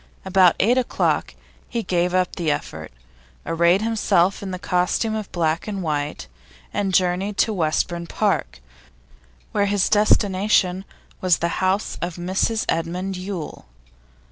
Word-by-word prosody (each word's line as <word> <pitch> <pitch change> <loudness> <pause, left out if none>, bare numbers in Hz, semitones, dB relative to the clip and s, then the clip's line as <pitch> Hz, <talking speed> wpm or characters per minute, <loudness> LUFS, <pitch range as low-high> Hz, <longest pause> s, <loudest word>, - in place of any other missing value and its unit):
About 185 -2 +5
eight 245 +6 +4
o'clock 250 - 0 0.3
he 235 -1 -2
gave 175 -2 0
up 185 -1 +1
the 170 -4 -1
effort, 80 - -4 0.5
arrayed 170 +4 +3
himself 205 -4 +2
in 200 - -5
the 185 - -4
costume 180 +5 0
of 215 -2 -4
black 165 0 -1
and 200 -3 -3
white, 145 - -2 0.5
and 195 -2 0
journeyed 185 +2 +1
to 220 - +2
Westbourne 170 0 -1
Park, 65 - -1 0.9
where 205 -1 +1
his 200 -1 +1
destination 200 -2 +2 0.4
was 180 -3 +3
the 170 +2 -2
house 190 +2 0
of 175 -1 -3
Mrs 190 +5 -1
Edmund 180 +4 -2
Yule. 185 - -6
185 Hz, 135 wpm, -22 LUFS, 170-200 Hz, 0.9 s, About